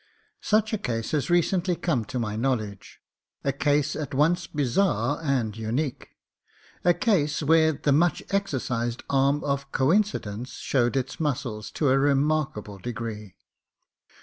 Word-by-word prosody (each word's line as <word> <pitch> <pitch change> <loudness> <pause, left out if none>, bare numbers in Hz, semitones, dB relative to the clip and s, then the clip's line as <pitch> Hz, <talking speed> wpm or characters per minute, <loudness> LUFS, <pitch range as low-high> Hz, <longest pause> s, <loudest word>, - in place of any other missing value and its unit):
Such 220 +1 +1
a 215 - 0
case 115 - -3
has 145 -4 0
recently 175 +1 +2
come 140 -10 -1
to 125 - -5
my 110 -3 -2
knowledge, 110 -5 -3 0.4
a 140 - 0
case 145 +1 +1
at 150 -3 -4
once 170 +5 +2
bizarre 150 +2 +1
and 130 -8 0
unique: 120 +6 -3 0.7
a 175 -1 +4
case 160 - +1
where 160 +1 +4
the 145 +1 0
much 160 +3 +2
exercised 125 -11 -1
arm 140 +2 +2
of 140 -1 -2
coincidence 130 - 0
showed 125 0 0
its 135 +1 -3
muscles 125 -8 -2
to 145 - +1
a 135 +1 +4
remaricable 140 -7 0
degree. 110 -4 -6
140 Hz, 135 wpm, -26 LUFS, 120-160 Hz, 0.7 s, a